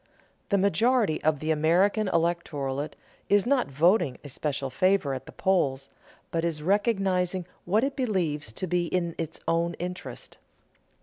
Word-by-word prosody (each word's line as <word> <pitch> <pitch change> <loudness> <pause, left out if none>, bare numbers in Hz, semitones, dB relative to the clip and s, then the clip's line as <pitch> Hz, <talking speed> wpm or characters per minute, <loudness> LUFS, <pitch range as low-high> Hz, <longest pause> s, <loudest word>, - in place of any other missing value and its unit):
The 200 - +3
majority 200 0 +2
of 155 -1 +2
the 155 +3 -2
American 180 +7 +3
electorate 155 -5 -1 0.3
is 205 0 +4
not 255 0 +2
voting 165 - +3
a 145 - -9
special 140 -1 -3
favor 185 -2 +2
at 130 0 -6
the - - -9
polls, 140 -8 0 0.4
but 165 -1 -1
is 160 -3 -2
recognizing 190 -2 +1 0.2
what 210 +6 +2
it 275 0 -1
believes 170 - -1
to 185 - -3
be 175 -1 0
in 170 -1 -1
its 165 -2 -4
own 170 0 +1
interest. 180 +1 -7
170 Hz, 145 wpm, -27 LUFS, 150-195 Hz, 0.4 s, is